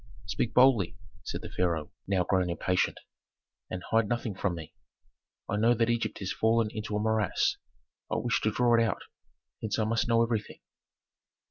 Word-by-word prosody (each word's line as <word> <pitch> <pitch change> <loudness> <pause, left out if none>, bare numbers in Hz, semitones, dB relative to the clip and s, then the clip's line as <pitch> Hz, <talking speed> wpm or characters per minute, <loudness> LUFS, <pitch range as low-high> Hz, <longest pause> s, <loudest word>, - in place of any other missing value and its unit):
"Speak 115 0 -2
boldly," 120 -6 +5 0.3
said - - -5
the - - -6
pharaoh, 85 -4 -1 0.2
now 95 -2 +2
grown 90 0 +1
impatient, 90 +2 0 0.7
"and 90 - -5
hide 110 -2 +3
nothing 120 -3 -1
from 95 -1 -1
me. 80 -2 -9 0.7
I 100 - -1
know 115 +3 +4
that 115 0 +2
Egypt 115 -2 -1
has 95 -1 -3
fallen 115 0 +2
into 105 -1 -4
a - - +1
morass; 110 -2 +1 0.5
I - - +1
wish 120 - 0
to 110 - +1
draw 120 +1 +3
it - - +4
out, 115 - -1 0.6
hence 110 -1 -1
I 110 - +2
must 110 +1 0
know 115 0 +4
everything." 115 -2 -2
110 Hz, 170 wpm, -29 LUFS, 95-115 Hz, 0.7 s, boldly